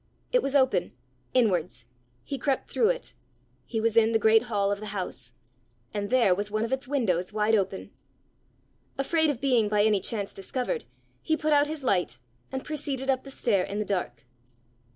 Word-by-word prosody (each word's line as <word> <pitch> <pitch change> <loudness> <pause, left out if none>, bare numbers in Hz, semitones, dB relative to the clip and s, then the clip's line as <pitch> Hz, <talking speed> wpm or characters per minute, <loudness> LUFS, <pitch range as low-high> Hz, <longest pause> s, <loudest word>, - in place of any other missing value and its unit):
It - - +4
was 275 -6 -2
open 260 -2 +2 0.4
inwards; 180 - +1 0.4
he 275 - -5
crept 270 +2 -1
through 450 - +3
it: - - -3 0.5
he 225 - -2
was 225 0 +1
in 230 0 +5
the - - +5
great 220 0 +5
hall 200 -2 +1
of 200 - -1
the 215 - -6
house 125 -10 -5 0.6
and 205 -1 -2
there 240 -7 +4
was 205 +3 -2
one 215 +2 0
of 235 - -3
its 265 -1 -2
windows 200 -11 0
wide 215 +1 +1
open! 195 -2 0 1.1
Afraid 315 +3 +2
of 280 -5 -1
being 245 -6 +2
by 210 -1 +3
any 210 -2 +3
chance 205 -1 -3
discovered, 255 - -3 0.4
he 315 -1 0
put 310 -1 +1
out 290 0 +4
his 305 -2 -5
light, 175 - +1 0.3
and 265 0 -4
proceeded 275 -3 -2
up 260 -1 -1
the - - -8
stair 220 -8 +1
in 200 - -4
the 210 - -1
dark. 180 -8 -3
225 Hz, 185 wpm, -27 LUFS, 200-275 Hz, 1.1 s, in